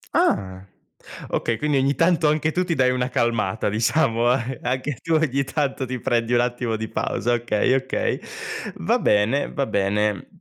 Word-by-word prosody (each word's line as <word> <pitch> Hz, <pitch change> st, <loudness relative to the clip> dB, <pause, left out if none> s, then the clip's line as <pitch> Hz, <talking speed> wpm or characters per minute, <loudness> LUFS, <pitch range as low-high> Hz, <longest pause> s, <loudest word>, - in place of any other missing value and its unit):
Ah. 95 Hz, -1 st, +1 dB, 0.7 s
Okay, 115 Hz, -, -1 dB
quindi 150 Hz, +3 st, 0 dB
ogni 135 Hz, +1 st, +2 dB
tanto 165 Hz, 0 st, +3 dB
anche 155 Hz, +1 st, +1 dB
tu 180 Hz, +3 st, 0 dB
ti 175 Hz, -2 st, -1 dB
dai 130 Hz, -2 st, +3 dB
una 125 Hz, 0 st, -1 dB
calmata 115 Hz, -4 st, 0 dB
diciamo, 115 Hz, +2 st, +2 dB
a 125 Hz, 0 st, +2 dB
e 130 Hz, -1 st, -5 dB
anche 130 Hz, +2 st, -2 dB
tu 165 Hz, -1 st, 0 dB
ogni 140 Hz, -3 st, +1 dB
tanto 140 Hz, -1 st, -2 dB
ti 130 Hz, 0 st, -4 dB
prendi 115 Hz, 0 st, 0 dB
un 120 Hz, -, +4 dB
attimo 120 Hz, -1 st, -1 dB
di 110 Hz, +1 st, -4 dB
pausa, 120 Hz, +2 st, -1 dB
okay, 120 Hz, 0 st, +1 dB
okay. 135 Hz, 0 st, -1 dB, 0.6 s
Va -, -, +1 dB
bene, 105 Hz, +7 st, +2 dB
va 140 Hz, -, -1 dB
bene. 105 Hz, -1 st, 0 dB
125 Hz, 175 wpm, -23 LUFS, 115-140 Hz, 0.7 s, un